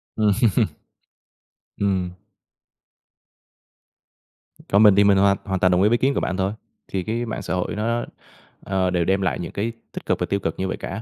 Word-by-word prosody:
Ừm. 105 -2 +2 1.5
Ừm. 95 -3 0 2.6
Còn 100 +2 +5
mình 105 -3 +7
thì 100 - +5
mình 100 -1 +5
hoàn 100 0 +4
hoàn 95 -2 -2
toàn 90 +1 +3
đồng 90 +1 +3
ý 105 - +5
với 120 - +3
kiến 135 +3 +1
của - - 0
bạn 95 - -2
thôi. 95 +2 0 0.3
Thì 95 -2 -3
cái 115 +4 -2
mạng 110 - -4
xã - - -4
hội 90 +3 -2
nó, 115 +3 -1 0.6
ờ, 95 -1 0
đều 90 -2 0
đem 95 +2 +1
lại 90 - -1
những 85 -2 -5
cái 110 +4 -2 0.2
tích - - -8
cực - - 0
và - - 0
tiêu 100 - -1
cực 80 -3 -4
như 95 - -1
vậy - - -3
cả. 95 +3 -6
100 Hz, 195 wpm, -22 LUFS, 95-105 Hz, 2.6 s, mình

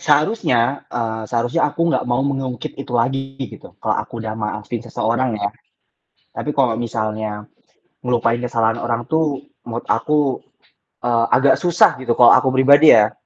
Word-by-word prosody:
seharusnya, 145 - +1
eee, 110 -2 -3
seharusnya 120 +7 0
aku 155 - -8
nggak - - 0
mau 120 +2 +1
mengungkit 135 -2 -4
itu 135 - -8
lagi 135 +3 -1
gitu, - - -13
kalau - - 0
aku - - -17
udah 110 - -3
maafin 105 +2 -4
seseorang 120 +1 -1
ya. 100 -1 -1 0.8
Tapi - - -5
kalau 130 -5 +2
misalnya 110 -2 -3 0.6
ngelupain 120 -1 +1
kesalahan 115 -2 0
orang 120 -1 -2
tuh 160 -3 0 0.2
menurut 120 0 -6
aku, 140 +3 0 0.6
eee, 115 -1 +2
agak 135 +2 +4
susah 175 -6 +3
gitu 120 -2 -1
kalau 120 - +7
aku 130 - +4
pribadi 140 +2 +7
ya. 105 0 +3
120 Hz, 150 wpm, -19 LUFS, 115-135 Hz, 0.8 s, kalau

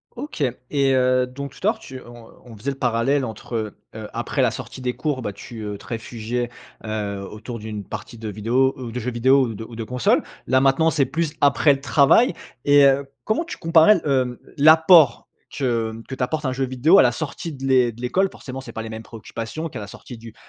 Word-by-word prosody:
OK. 290 - -4 0.3
Et 135 -2 +2
heu, 130 0 +2
donc, 140 +2 -7
tout 185 - -3
à 215 - +6
l'heure 220 - -11
tu 130 -8 -10
on 120 -1 -13 0.2
on 115 -3 -12
faisait 140 +7 -3
le 135 - -8
parallèle 130 +3 +1
entre, 110 -1 -5 0.2
heu, 110 -1 -7
après 120 +4 -2
la 125 - +4
sortie 130 0 -8
des 125 -1 -2
cours, 145 -5 -2
bah, 105 - -3
tu, 110 +2 -10
heu, 105 -1 -5
te - - -16
réfugiais, 115 +1 -4 0.4
heu, 100 -2 -4
autour 115 +2 -8
d'une 105 -1 -6
partie 115 - -8
de 110 0 -7
vidéos 120 +6 +1
ou 125 -3 -6
de 125 - -4
jeux 125 +2 -3
vidéo 130 +4 +4
ou - - -5
de 110 - -7
ou 115 +1 -11
de 115 - -4
consoles. 125 +2 +1 0.2
Là 130 +1 +4
maintenant, 135 +4 +3
c'est 145 -4 +2
plus 160 +2 -2
après 145 +1 +5
le 135 - -6
travail. 150 - +4 0.3
Et 145 -1 +6
heu, 135 0 +3 0.2
comment 220 +10 0
tu - - -7
comparerais 165 +4 +6
l - - -2
hem, 130 -3 +1 0.2
l'apport 160 +2 +6 0.3
que, 115 -5 0
mmh, 115 +1 -10
que 130 - -4
t'apporte 135 +4 -2
un 130 - 0
jeu 135 +1 -1
vidéo 130 +9 +4
à - - +9
la 120 - +4
sortie 155 +5 -5
de 135 -1 -10
l'é 130 -3 +3
de 115 +1 -13
l'école? 190 +11 +1
Forcément, 130 0 -8
c'est 135 - -9
pas 110 - -4
les 115 - -7
mêmes 110 0 -7
préoccupations 115 +8 -6
qu'à - - -7
la 105 - -7
sortie 120 +4 -11
du 115 -1 -12
125 Hz, 230 wpm, -22 LUFS, 115-140 Hz, 0.4 s, à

